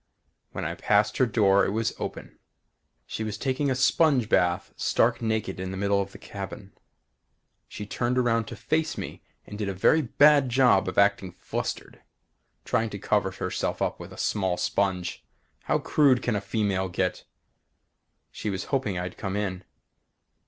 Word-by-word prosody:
When - - -4
I 80 - -2
passed 105 +4 +2
her 130 - +3
door 100 -3 +4
it - - +1
was 110 +2 -1
open. - - -7 0.7
She 110 - -4
was 110 -1 -4
taking 135 +4 -1
a 130 - +1
sponge 130 -2 +3
bath, 90 -4 +1
stark - - +1
naked 110 -4 -2
in 95 0 -4
the 95 - -5
middle 100 0 +1
of 100 0 -5
the - - -11
cabin. 100 -1 -8 0.9
She 105 - -7
turned 120 +4 -1
around 115 -2 +2
to - - -8
face 160 +1 -1
me - - -6 0.2
and 105 - -9
did 105 -2 -1
a 95 - -4
very 155 - +4
bad 145 +1 +4
job 125 -7 +4
of 95 - -4
acting 100 -2 +3
flustered, - - -5 0.6
trying 115 -2 0
to 100 - -6
cover 100 0 +1
herself 95 - -3
up - - -1
with - - -9
a - - -11
small 95 -4 0
sponge! 95 -3 -1 0.4
How - - +2
crude 140 -5 +3
can 120 - 0
a 100 - -1
female 100 -2 -1
get? 90 +1 -2 1.1
She 105 - -4
was 95 -1 -3
hoping 105 -9 0
I'd 90 0 -5
come 95 -1 -3
in. 95 -3 -3
105 Hz, 170 wpm, -26 LUFS, 95-120 Hz, 1.1 s, door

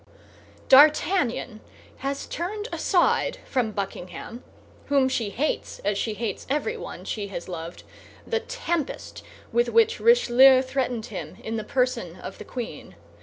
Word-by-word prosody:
D'Artagnan 275 - +4 0.4
has 275 +1 -3
turned 415 +6 -4
aside 360 -3 +2
from 250 -4 0
Buckingham, 200 +3 -6 0.4
whom 275 -2 +3
she 235 -5 -1
hates 280 +9 -2
as 205 0 +1
she 215 +2 -2
hates 230 0 -4
everyone 440 - -3
she 205 -2 -3
has 190 -3 -7
loved, 170 -1 -7 0.4
the 460 - 0
tempest 345 - -4 0.3
with 475 - +2
which 455 +1 +3
Richelieu 265 - +6
threatened 255 -4 -2
him - - -6
in 225 +1 -3
the 220 - -3
person 250 -7 -1
of - - -9
the - - -8
queen. 225 - -7
260 Hz, 130 wpm, -25 LUFS, 220-320 Hz, 0.4 s, Richelieu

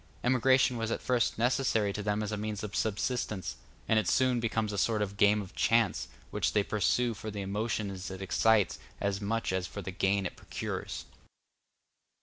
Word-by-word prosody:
Emigration 130 0 +4
was 115 -1 -2
at - - -1
first 125 -2 +1
necessary 115 -4 +2
to 105 - -3
them 105 +1 0
as 105 - -3
a - - -1
means 105 0 -4
of 105 - -5
subsistence; 110 -2 -1 0.3
and 110 - +4
it 105 - -2
soon 130 -2 +3
becomes 110 -2 -1
a - - -3
sort 110 +1 +2
of 100 -1 -2
game 105 +1 +4
of 95 - -12
chance, 115 -1 +2 0.2
which - - 0
they 105 - +3
pursue 115 +4 +1
for 110 0 -6
the 105 -1 -4
emotions 100 -1 -2
it 95 -1 -7
excites 105 +1 +2 0.2
as 100 0 -1
much 110 -1 -1
as 95 -1 -1
for 100 +3 -7
the 95 - -4
gain 95 +2 +1
it - - -4
procures. - - -5
105 Hz, 185 wpm, -30 LUFS, 100-115 Hz, 0.3 s, Emigration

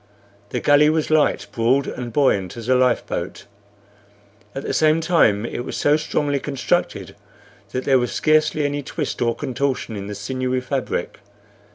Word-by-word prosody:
The - - -2
galley 145 +1 +5
was 155 0 0
light, 155 -1 +2
broad, 130 +3 +2
and 125 -1 -5
buoyant 110 -8 +1
as 115 -1 -7
a 130 - +4
life 125 -1 +2
boat; - - -5 1.1
at 135 - -4
the - - -3
same 155 +1 +3
time 155 - +3
it - - -5
was 120 - -5
so 145 +1 +3
strongly 145 -2 -1
constructed 135 -1 -2 0.6
that 130 - -3
there 135 -2 +4
was 125 - -2
scarcely 155 -1 +2
any 145 0 -1
twist 145 0 -4
or 115 -1 +1
contortion 130 -3 -2
in 100 -1 -6
the 105 - -5
sinewy 130 +4 -2
fabric. 130 +1 -3
135 Hz, 165 wpm, -21 LUFS, 120-150 Hz, 1.1 s, galley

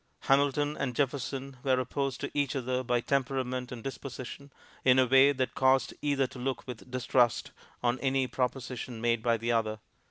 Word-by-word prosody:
Hamilton 145 +2 +2
and 125 -3 -2
Jefferson 135 0 -2
were 130 -2 +3
opposed 135 +1 -2
to - - -3
each 145 -3 0
other 130 -1 -1
by 120 -1 0
temperament 130 -1 -1
and 120 -3 -7
disposition, 135 +1 -7 0.3
in 130 0 +5
a 130 - +6
way 135 +2 +6
that 130 -2 -1
caused 130 -1 +3
either 140 -2 +2
to 125 - -9
look 130 0 -3
with 125 -1 -9
distrust 125 -1 +1 0.3
on 120 +1 +1
any 135 -1 +1
proposition 125 -2 -3
made 115 0 +1
by 115 0 +2
the 115 +2 -1
other. 110 -2 0
130 Hz, 170 wpm, -30 LUFS, 125-135 Hz, 0.3 s, a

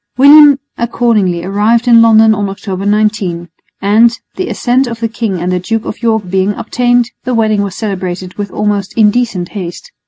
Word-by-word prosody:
William 285 +1 +7 0.2
accordingly 220 -7 0
arrived 215 +5 0
in 230 -1 +6
London 220 -1 +5
on 205 -2 -2
October 195 0 -5
19; 205 -5 -1 0.3
and, 225 +4 +3 0.2
the 370 0 -4
assent 255 +2 0
of 230 -1 -6
the 230 - -1
king 220 -5 -4
and 180 +2 -2
the 180 - 0
Duke 225 +5 -3
of - - -7
York 220 -4 0
being 190 +2 0
obtained, 245 +1 0
the 255 -2 -2
wedding 215 -2 +1
was 200 -2 -4
celebrated 185 -4 -5
with 205 -1 -5
almost 205 -1 -3
indecent 210 -4 +1
haste. 200 - -8
215 Hz, 175 wpm, -12 LUFS, 195-235 Hz, 0.3 s, William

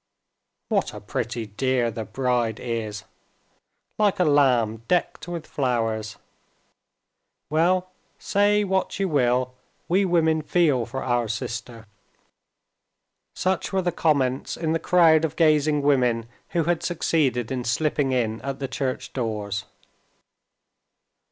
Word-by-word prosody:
"What - - 0
a - - -6
pretty 115 0 -4
dear 120 +2 0
the 110 0 -5
bride 120 -2 -1
is—like 115 - -5
a - - +5
lamb 130 -8 +3
decked 175 -3 0
with 170 -2 -5
flowers! 115 -5 -1 1.3
Well, 180 +4 +2 0.3
say 205 +1 +2
what 190 0 -1
you 195 - +1
will, 125 -4 +1 0.3
we 190 +3 +3
women 160 -3 +2
feel 150 -7 +2
for 135 - -5
our 120 -2 0
sister." 115 0 -5 1.5
Such 185 -1 -1
were 190 -1 0
the 175 - +1
comments 135 -6 0
in 160 -1 -1
the 165 - 0
crowd 165 -3 +4
of 160 -1 -1
gazing 150 -2 +3
women 125 -5 +2 0.2
who 170 - 0
had 170 +1 0
succeeded 140 -8 0
in 125 -2 -2
slipping 140 +2 0
in 115 -3 -1
at 135 0 -4
the 135 - -3
church 130 0 -3
doors. 105 -5 -3
135 Hz, 120 wpm, -24 LUFS, 120-165 Hz, 1.5 s, a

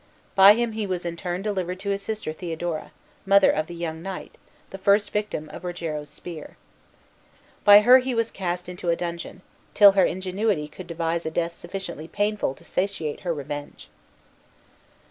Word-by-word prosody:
By 195 +2 +8
him 235 0 0
he 215 -1 -3
was 180 -2 -3
in 170 -1 -3
turn 175 +2 -4
delivered 185 -3 -2
to 200 0 -2
his 200 0 -2
sister 215 -7 -4
Theodora, 165 -1 -4 0.3
mother 200 0 +5
of 155 0 -1
the 175 - -8
young 165 -1 -4
knight, 190 +1 -7 0.4
the 195 - -8
first 200 +1 +3
victim 210 -7 -3
of - - -10
Rogero's 165 -4 -4
spear. 165 -4 -9 1.1
By 205 0 +9
her 250 +4 +8
he 255 -1 -2
was 230 0 0
cast 180 -2 -3
into 180 -1 -5
a 170 - +3
dungeon, 170 +2 -6 0.3
till 205 -1 +9
her 195 -1 +3
ingenuity 185 -2 -1
could 170 +4 -11
devise 165 0 -2
a - - 0
death 170 +1 -2
sufficiently 170 -3 -7
painful 205 -7 -1
to - - -19
satiate 180 -6 -2
her 175 - -2
revenge. 145 -1 -6
180 Hz, 170 wpm, -25 LUFS, 170-200 Hz, 1.1 s, By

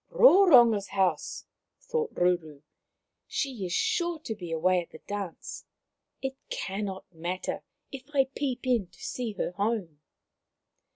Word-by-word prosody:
" - - -47
Roronga's 285 - +7
house! 185 -6 0 0.2
" - - -57
thought 465 -1 0
Ruru. 165 -5 0 0.3
" - - -57 0.3
She 250 -10 -2
is - - -7
sure 345 - +1
to 230 - -4
be 180 -6 -8
away 180 +3 +3
at 170 - -11
the - - -11
dance. 200 -4 -5 0.6
It 265 0 -2
cannot 195 -1 -4
matter 175 +3 -3 0.3
if 265 -3 -8
I 275 -2 +4
peep 265 -2 -2
in 240 -7 +2
to 175 - -22
see 240 -4 -3
her 195 - -2
home." 200 -6 -2
205 Hz, 150 wpm, -28 LUFS, 180-265 Hz, 0.6 s, Roronga's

